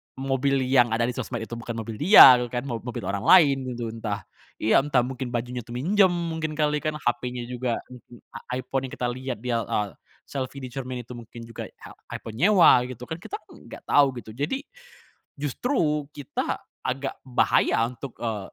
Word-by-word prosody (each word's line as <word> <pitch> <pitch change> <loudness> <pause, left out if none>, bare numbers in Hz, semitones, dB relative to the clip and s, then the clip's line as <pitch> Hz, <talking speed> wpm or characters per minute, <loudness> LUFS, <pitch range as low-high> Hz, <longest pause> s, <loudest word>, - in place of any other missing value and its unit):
mobil 135 0 0
yang 125 -3 +3
ada 115 - +1
di 120 - 0
sosmed 120 -2 -4
itu 115 +1 -7
bukan 120 -1 -6
mobil 115 -1 -6
dia 145 - +10
gitu 120 - -2
kan 120 +1 -3
mob 120 -4 -4
mobil 120 - -5
orang 100 +1 -2
lain 140 -8 +6
gitu 115 -2 -4
entah 110 -3 -4 0.3
iya 110 - +3
entah 135 -3 +2
mungkin 130 0 -4
bajunya 120 +1 -3
tuh 120 +1 -9
minjem 190 +9 +4
mungkin 165 -3 -3
kali 150 -1 +1
kan 155 +1 -2
hapenya 120 0 -1
juga 125 0 -3
m 125 - -10
m 120 +1 -17 0.2
ai 125 +1 -3
iPhone 135 +1 -2
yang - - -12
kita 125 - -2
lihat 125 -2 -6
dia, 120 -2 0
eee, 105 -2 -1 0.3
selfie 135 0 -5
di 125 - -6
cermin 130 -1 -5
itu 120 - -14
mungkin 120 -1 -10
juga 115 -1 -7
ai - - -20 0.4
iPhone 110 +1 -8
nyewa 170 -10 +6
gitu 125 -1 -9
kan? 160 +6 -6
Kita 375 - -7
kan - - -17
gak - - -11
tau 145 -1 +5
gitu 120 -3 -8
jadi, 145 - -3 0.8
justru 150 - 0
kita 145 -3 -3 0.2
agak 135 +2 -3
bahaya 125 -2 +2
untuk, 125 +1 -8
eee, 110 -4 -4
125 Hz, 195 wpm, -25 LUFS, 120-140 Hz, 0.8 s, dia